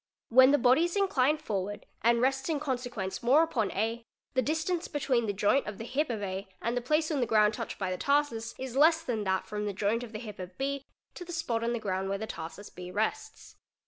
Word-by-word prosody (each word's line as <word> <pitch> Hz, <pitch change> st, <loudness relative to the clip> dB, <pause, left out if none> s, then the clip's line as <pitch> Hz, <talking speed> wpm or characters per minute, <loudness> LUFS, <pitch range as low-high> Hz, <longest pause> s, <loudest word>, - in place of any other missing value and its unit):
When 260 Hz, +2 st, +8 dB
the 290 Hz, -, +5 dB
body 255 Hz, +3 st, +4 dB
_ -, -, +4 dB
is 345 Hz, -, -3 dB
inclined 305 Hz, -6 st, +2 dB
forward 205 Hz, -2 st, -3 dB, 0.2 s
and 235 Hz, +1 st, +3 dB
rests 265 Hz, +3 st, +1 dB
in 310 Hz, -3 st, 0 dB
consequence 245 Hz, -9 st, -3 dB
more 270 Hz, +7 st, +5 dB
upon 235 Hz, -, 0 dB
A, 225 Hz, +4 st, -1 dB, 0.3 s
the 260 Hz, -, +3 dB
distance 320 Hz, +5 st, -1 dB
_ -, -, -22 dB
between 260 Hz, -6 st, +1 dB
the -, -, +1 dB
joint 205 Hz, +7 st, +2 dB
of 210 Hz, -2 st, -5 dB
the -, -, -6 dB
hip 275 Hz, +5 st, -1 dB
of 220 Hz, -4 st, -3 dB
A 190 Hz, +1 st, -4 dB
and 235 Hz, +2 st, -1 dB
the 245 Hz, -, 0 dB
place 305 Hz, +6 st, +1 dB
on 295 Hz, -, 0 dB
the 245 Hz, -, +1 dB
ground 215 Hz, -1 st, +4 dB
touched -, -, -5 dB
by 190 Hz, -2 st, -2 dB
the 185 Hz, -, -3 dB
tarsus 280 Hz, -6 st, 0 dB
is 260 Hz, -1 st, -6 dB
less 320 Hz, +3 st, +5 dB
than 225 Hz, -7 st, -2 dB
that 190 Hz, 0 st, 0 dB
from 210 Hz, 0 st, -3 dB
the 205 Hz, -, -2 dB
joint 205 Hz, +4 st, 0 dB
of 240 Hz, -3 st, -8 dB
the 215 Hz, -, -5 dB
hip 215 Hz, -4 st, -8 dB
of 185 Hz, 0 st, -8 dB
B 275 Hz, 0 st, -2 dB, 0.3 s
to -, -, -8 dB
the 350 Hz, -, -9 dB
spot 250 Hz, -9 st, -1 dB
on. 235 Hz, +1 st, 0 dB
the 235 Hz, -, -1 dB
ground 195 Hz, -2 st, -2 dB
where 195 Hz, -, -1 dB
the 220 Hz, -, -4 dB
tarsus 170 Hz, +2 st, -8 dB
B 180 Hz, 0 st, -8 dB
rests. 220 Hz, -, -3 dB
235 Hz, 250 wpm, -30 LUFS, 210-285 Hz, 0.3 s, When